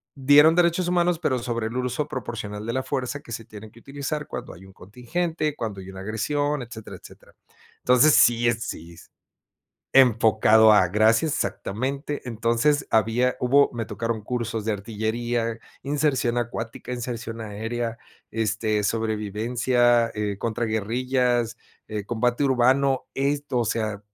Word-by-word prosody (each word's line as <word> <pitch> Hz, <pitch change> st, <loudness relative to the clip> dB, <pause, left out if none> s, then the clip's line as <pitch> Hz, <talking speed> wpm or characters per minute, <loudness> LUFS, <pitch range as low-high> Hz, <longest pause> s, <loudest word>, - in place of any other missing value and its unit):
dieron 145 Hz, +4 st, +6 dB
derechos 175 Hz, 0 st, +2 dB
humanos, 175 Hz, -1 st, +1 dB
pero, 130 Hz, -, 0 dB
sobre 115 Hz, -2 st, -3 dB
el 115 Hz, -, -7 dB
uso 125 Hz, +4 st, -2 dB
proporcional 110 Hz, -6 st, -6 dB
de 115 Hz, -, -3 dB
la 130 Hz, 0 st, -1 dB
fuerza, 135 Hz, +1 st, -3 dB
que 115 Hz, -, -14 dB
se 115 Hz, -, -5 dB
tiene 105 Hz, 0 st, -11 dB
que 115 Hz, -, -17 dB
utilizar 145 Hz, +2 st, -4 dB
cuando -, -, -7 dB
hay 95 Hz, +3 st, -14 dB
un 95 Hz, -, -16 dB
contingente, 155 Hz, -, -3 dB
cuando 105 Hz, -4 st, -5 dB
hay 95 Hz, -, -10 dB
una 95 Hz, 0 st, -9 dB
agresión, 145 Hz, +7 st, -1 dB
etcétera, 110 Hz, -2 st, -9 dB
etcétera. -, -, -17 dB, 0.4 s
Entonces 125 Hz, +4 st, +5 dB
sí 120 Hz, 0 st, +5 dB
es, 115 Hz, -1 st, 0 dB
sí 85 Hz, +1 st, -7 dB
s -, -, -15 dB, 0.9 s
enfocado, 110 Hz, -3 st, +5 dB
a 95 Hz, -3 st, +5 dB
gracias 110 Hz, -, +3 dB
exactamente. 135 Hz, +9 st, -3 dB
Entonces 120 Hz, +5 st, +1 dB
había 115 Hz, +3 st, +2 dB
hubo, 140 Hz, +3 st, +4 dB
me 115 Hz, -3 st, -4 dB
tocaron 115 Hz, +1 st, -3 dB
cursos 115 Hz, -2 st, -3 dB
de 110 Hz, -, -1 dB
artillería, 115 Hz, +3 st, -2 dB, 0.2 s
inserción 135 Hz, -4 st, 0 dB
acuática, 115 Hz, 0 st, -5 dB
inserción 115 Hz, -2 st, -5 dB
aérea, 115 Hz, +2 st, -4 dB, 0.3 s
este, 110 Hz, -1 st, -1 dB
sobrevivencia, 115 Hz, +3 st, +1 dB
eh, 105 Hz, -2 st, -2 dB
contra 115 Hz, 0 st, -2 dB
guerrillas, 120 Hz, +2 st, 0 dB, 0.3 s
eh, 105 Hz, -2 st, -4 dB
combate 120 Hz, +4 st, 0 dB
urbano, 130 Hz, +1 st, +2 dB
esto, 140 Hz, -1 st, -1 dB
o 120 Hz, -, +1 dB
sea 110 Hz, -2 st, -2 dB
120 Hz, 145 wpm, -24 LUFS, 110-130 Hz, 0.9 s, dieron